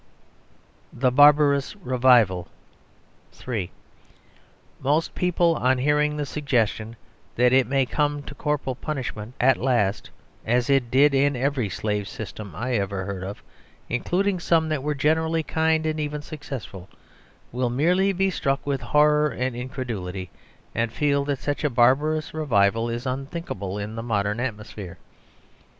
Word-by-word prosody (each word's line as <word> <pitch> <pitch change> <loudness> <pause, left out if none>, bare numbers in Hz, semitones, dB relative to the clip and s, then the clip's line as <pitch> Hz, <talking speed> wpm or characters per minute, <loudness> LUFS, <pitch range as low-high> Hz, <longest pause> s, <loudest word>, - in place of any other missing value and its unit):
The 130 +1 +1
Barbarous 145 +3 +5
Revival 125 - +3 0.9
(3) 110 -8 -4 1.1
Most 150 +5 0
people, 175 -1 +2
on 130 -1 +2
hearing 150 +3 +1
the 145 - -2
suggestion 120 -6 -1 0.4
that 125 +1 +3
it 130 -3 +4
may 135 0 +2
come 145 +2 -1
to 145 - -8
corporal 145 -1 -2
punishment 125 -5 -5
at 130 +1 +4
last 120 -6 0 0.3
(as 120 +4 +1
it 135 -4 +2
did 140 +4 +4
in 140 +1 +3
every 130 -3 -1
slave 105 +1 -2
system 105 -5 -8
I 125 +7 -3
ever 100 -1 -2
heard 95 -2 -5
of, 100 +2 -7 0.5
including 185 +10 0
some 165 -2 +2
that 155 -3 -1
were 150 +2 -2
generally 160 +3 +1
kindly, 160 0 +1
and 155 - -5
even 150 -1 -3
successful), 130 - -8 0.6
will 125 0 -1
merely 180 +10 +2
be 195 0 +1
struck 135 -5 -1
with 140 -2 -1
horror 150 0 +3
and 125 -2 -3
incredulity, 110 -8 -5 0.4
and 115 0 -1
feel 140 +1 +1
that 140 -1 -1
such 145 +3 -3
a 150 - +2
barbarous 140 +6 +2
revival 115 -7 +1
is 120 +2 -4
unthinkable 130 - -4
in 105 +1 -5
the 115 - -5
modern 105 -2 -1
atmosphere. 105 -6 -6
130 Hz, 140 wpm, -24 LUFS, 115-150 Hz, 1.1 s, Barbarous